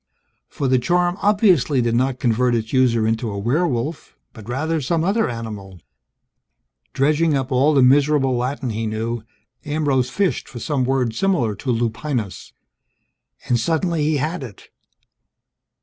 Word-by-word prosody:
For 140 Hz, -, -3 dB
the 130 Hz, 0 st, +3 dB
charm 175 Hz, +5 st, +1 dB
obviously 185 Hz, -, +3 dB
did 120 Hz, -1 st, +1 dB
not 130 Hz, +2 st, +1 dB
convert 120 Hz, 0 st, +1 dB
its 110 Hz, -1 st, -3 dB
user 120 Hz, -4 st, +3 dB
into 115 Hz, +1 st, -1 dB
a 100 Hz, -, -5 dB
werewolf, 140 Hz, -, -2 dB, 0.2 s
but 110 Hz, -2 st, -12 dB
rather 155 Hz, +5 st, -1 dB
some 160 Hz, +4 st, 0 dB
other 210 Hz, +5 st, +1 dB
animal... 105 Hz, -6 st, -7 dB, 1.1 s
Dredging 150 Hz, +2 st, +2 dB
up 135 Hz, 0 st, -4 dB
all 140 Hz, +4 st, +3 dB
the 135 Hz, -, +5 dB
miserable 135 Hz, 0 st, +3 dB
Latin 125 Hz, +1 st, -2 dB
he 110 Hz, +1 st, -3 dB
knew, 115 Hz, +2 st, -3 dB, 0.4 s
Ambrose 145 Hz, -4 st, 0 dB
fished 195 Hz, +5 st, -1 dB
for 125 Hz, -, -9 dB
some 135 Hz, +1 st, -1 dB
word 125 Hz, -3 st, 0 dB
similar 130 Hz, -, +1 dB
to 130 Hz, -, -6 dB
lupinus. 115 Hz, -1 st, -3 dB, 1.0 s
And 120 Hz, -1 st, +2 dB
suddenly 165 Hz, +4 st, 0 dB
he 150 Hz, 0 st, +1 dB
had 155 Hz, +5 st, -2 dB
it! 120 Hz, -7 st, -11 dB
130 Hz, 145 wpm, -21 LUFS, 115-155 Hz, 1.1 s, the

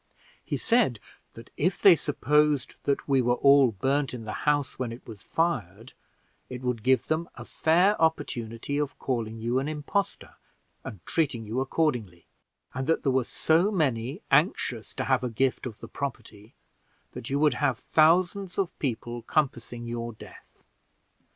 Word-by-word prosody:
He -, -, -3 dB
said 225 Hz, -, +2 dB, 0.4 s
that 115 Hz, 0 st, -12 dB
if 180 Hz, +4 st, 0 dB
they 195 Hz, -4 st, +8 dB
supposed 150 Hz, -2 st, +1 dB
that 140 Hz, -, 0 dB
we 135 Hz, -2 st, +3 dB
were 120 Hz, 0 st, +2 dB
all 140 Hz, -2 st, +5 dB
burned 135 Hz, +6 st, -1 dB
in 115 Hz, -, -7 dB
the 110 Hz, -, -4 dB, 0.2 s
house 145 Hz, -2 st, 0 dB
when 125 Hz, -3 st, -2 dB
it 115 Hz, -, -10 dB
was 110 Hz, -4 st, -10 dB
fired, 120 Hz, -, -2 dB, 0.6 s
it 125 Hz, 0 st, -7 dB
would 125 Hz, -3 st, -1 dB
give 130 Hz, +3 st, +2 dB
them 160 Hz, +2 st, -1 dB
a -, -, -9 dB
fair 180 Hz, +6 st, +2 dB
opportunity 130 Hz, -4 st, -1 dB
of 145 Hz, -2 st, -3 dB
calling 115 Hz, -4 st, -3 dB
you 120 Hz, +3 st, 0 dB
an 135 Hz, -, -3 dB
impostor 155 Hz, +6 st, -3 dB, 0.5 s
and 100 Hz, -5 st, -9 dB
treating 130 Hz, -9 st, -1 dB
you 110 Hz, +4 st, -2 dB
accordingly, 125 Hz, -, -1 dB, 0.5 s
and 130 Hz, 0 st, -4 dB
that 165 Hz, -, +1 dB
there 135 Hz, -, +2 dB
were 130 Hz, 0 st, +2 dB
so 165 Hz, -, +2 dB
many 140 Hz, -, -1 dB
anxious 140 Hz, -, +1 dB
to 130 Hz, -, -2 dB
have 130 Hz, -1 st, +1 dB
a 125 Hz, -, -1 dB
gift 130 Hz, +3 st, 0 dB
of 110 Hz, -4 st, -9 dB
the -, -, -8 dB
property, 115 Hz, -6 st, -7 dB, 0.6 s
that 120 Hz, -, -8 dB
you 140 Hz, -, 0 dB
would 150 Hz, -1 st, +3 dB
have 135 Hz, -2 st, 0 dB
thousands 175 Hz, +6 st, +2 dB
of 195 Hz, -3 st, -2 dB
people 120 Hz, -2 st, -3 dB
compassing 120 Hz, -3 st, -2 dB
your 115 Hz, 0 st, -4 dB
death. 110 Hz, -, -15 dB
130 Hz, 165 wpm, -27 LUFS, 120-155 Hz, 0.6 s, they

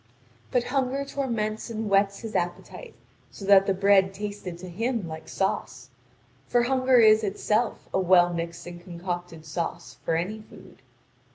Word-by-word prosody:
But 250 Hz, -1 st, +1 dB
hunger 270 Hz, +1 st, -1 dB
torments 230 Hz, -7 st, -3 dB
and 225 Hz, -1 st, -3 dB
whets 200 Hz, 0 st, +2 dB
his 225 Hz, -2 st, -7 dB
appetite, 180 Hz, -, -4 dB, 0.3 s
so 200 Hz, -, -10 dB
that 195 Hz, -1 st, +6 dB
the 195 Hz, -, +3 dB
bread 195 Hz, 0 st, +4 dB
tasted 205 Hz, -3 st, -6 dB
to 185 Hz, +1 st, -9 dB
him 225 Hz, +2 st, -2 dB
like 160 Hz, 0 st, -8 dB
sauce. 190 Hz, -, -3 dB, 0.6 s
For 240 Hz, -1 st, +3 dB
hunger 255 Hz, 0 st, +3 dB
is 220 Hz, -1 st, +6 dB
itself 215 Hz, +3 st, -1 dB
a -, -, +2 dB
well 175 Hz, -1 st, +5 dB
mixed 170 Hz, 0 st, -5 dB
and 175 Hz, 0 st, -9 dB
concocted 175 Hz, -2 st, -6 dB
sauce 170 Hz, +2 st, -5 dB
for 165 Hz, -, 0 dB
any 195 Hz, +7 st, -2 dB
food. -, -, -16 dB
200 Hz, 155 wpm, -26 LUFS, 175-225 Hz, 0.6 s, that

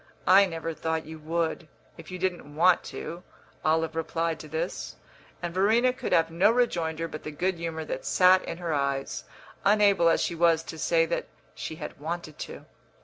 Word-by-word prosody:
"I 195 Hz, +2 st, +7 dB
never 165 Hz, -1 st, -4 dB
thought 160 Hz, 0 st, -2 dB
you 160 Hz, +1 st, -9 dB
would, 165 Hz, +1 st, -2 dB, 0.3 s
if -, -, -12 dB
you 185 Hz, -, -5 dB
didn't 175 Hz, -5 st, -3 dB
want 175 Hz, +2 st, +4 dB
to," 170 Hz, +2 st, -6 dB, 0.4 s
Olive 160 Hz, +1 st, +1 dB
replied 165 Hz, 0 st, -1 dB
to 155 Hz, -, -9 dB
this; 160 Hz, +4 st, -4 dB, 0.5 s
and 170 Hz, -1 st, -3 dB
Verena 225 Hz, +7 st, +3 dB
could -, -, -5 dB
have 165 Hz, 0 st, +3 dB
no 175 Hz, +5 st, +4 dB
rejoinder 165 Hz, -9 st, 0 dB
but 155 Hz, -1 st, -7 dB
the -, -, -6 dB
good 175 Hz, +4 st, -1 dB
humour 160 Hz, -1 st, -4 dB
that -, -, -4 dB
sat 185 Hz, 0 st, +5 dB
in 165 Hz, -, -5 dB
her 170 Hz, -2 st, -2 dB
eyes, 140 Hz, -1 st, -2 dB, 0.4 s
unable 200 Hz, -4 st, +5 dB
as 165 Hz, -, +3 dB
she -, -, -1 dB
was 165 Hz, -1 st, +3 dB
to 160 Hz, 0 st, -8 dB
say 165 Hz, +1 st, +3 dB
that 170 Hz, -, -2 dB, 0.3 s
she 160 Hz, -, -6 dB
had 155 Hz, -, -8 dB
wanted 160 Hz, 0 st, -5 dB
to. -, -, -7 dB
165 Hz, 185 wpm, -27 LUFS, 160-180 Hz, 0.5 s, I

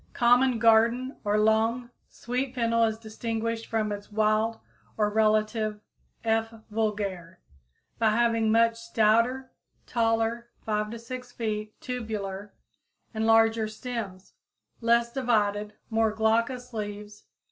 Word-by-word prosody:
_ -, -, -33 dB
Common 245 Hz, +1 st, +4 dB
garden 230 Hz, +3 st, +3 dB
or 210 Hz, 0 st, +1 dB
long, 225 Hz, +3 st, +2 dB, 0.2 s
sweet 250 Hz, +2 st, -3 dB
fennel 230 Hz, -1 st, +2 dB
is 220 Hz, -1 st, -1 dB
distinguished 225 Hz, +1 st, -4 dB
from 215 Hz, -2 st, -1 dB
its 205 Hz, +1 st, -7 dB
wild 215 Hz, +1 st, +1 dB, 0.4 s
or 210 Hz, -1 st, +2 dB
better -, -, -11 dB
relative 215 Hz, 0 st, +1 dB, 0.4 s
(F. 225 Hz, 0 st, +1 dB, 0.2 s
vulgare) 200 Hz, -5 st, -2 dB, 0.6 s
by 225 Hz, -1 st, +4 dB
having 230 Hz, 0 st, +2 dB
much 230 Hz, 0 st, +3 dB
stouter, 230 Hz, +3 st, +1 dB, 0.3 s
taller 230 Hz, 0 st, 0 dB, 0.2 s
(5 210 Hz, -1 st, -1 dB
to 235 Hz, -, -6 dB
6 245 Hz, +2 st, -8 dB
feet) 215 Hz, -2 st, -4 dB
tubular 210 Hz, -5 st, -5 dB, 0.6 s
and 220 Hz, 0 st, -1 dB
larger 225 Hz, 0 st, +4 dB
stems, 215 Hz, -4 st, -6 dB, 0.5 s
less 235 Hz, 0 st, +2 dB
divided, 210 Hz, -5 st, 0 dB, 0.2 s
more 225 Hz, 0 st, +2 dB
glaucous 230 Hz, +3 st, 0 dB
leaves. 210 Hz, -1 st, -6 dB
225 Hz, 120 wpm, -27 LUFS, 215-235 Hz, 0.6 s, Common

